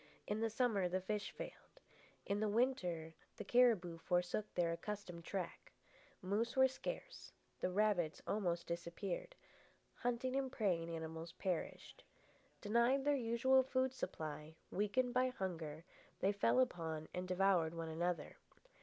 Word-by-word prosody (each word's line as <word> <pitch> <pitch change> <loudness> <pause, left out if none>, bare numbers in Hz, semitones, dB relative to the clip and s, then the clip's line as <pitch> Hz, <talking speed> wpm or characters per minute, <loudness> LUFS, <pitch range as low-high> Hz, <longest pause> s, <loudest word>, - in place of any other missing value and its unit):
In 210 +1 -1
the 225 0 +1
summer 220 -5 +2
the 185 +1 +1
fish 205 +2 -2
failed. - - -9 0.5
In 200 +1 0
the 215 0 +1
winter 180 -9 +1 0.2
the - - -4
cariboo 205 -7 +4
forsook 180 +5 0
their 170 -2 +2
accustomed 180 -2 -5
track. 185 -4 -4 0.5
Moose 210 +5 0
were 265 0 +7
scarce, - - -6 0.3
the - - 0
rabbits 185 -4 +2
almost 175 -5 0
disappeared, 175 - -4 0.6
hunting 245 +2 -1
and 270 -1 0
preying 175 -9 0
animals 165 0 -5
perished. 185 -3 -3 0.6
Denied 235 +6 +3
their 290 0 +4
usual 260 +2 +4
food 260 0 +1
supply, 155 - -5 0.2
weakened 240 +5 +1
by 255 0 +4
hunger, 170 -9 -4 0.3
they 195 - +3
fell 205 +5 +3
upon 160 -10 0
and 180 0 -3
devoured 180 -3 +3
one 165 -1 -3
another. 165 0 -2
195 Hz, 135 wpm, -39 LUFS, 170-240 Hz, 0.6 s, were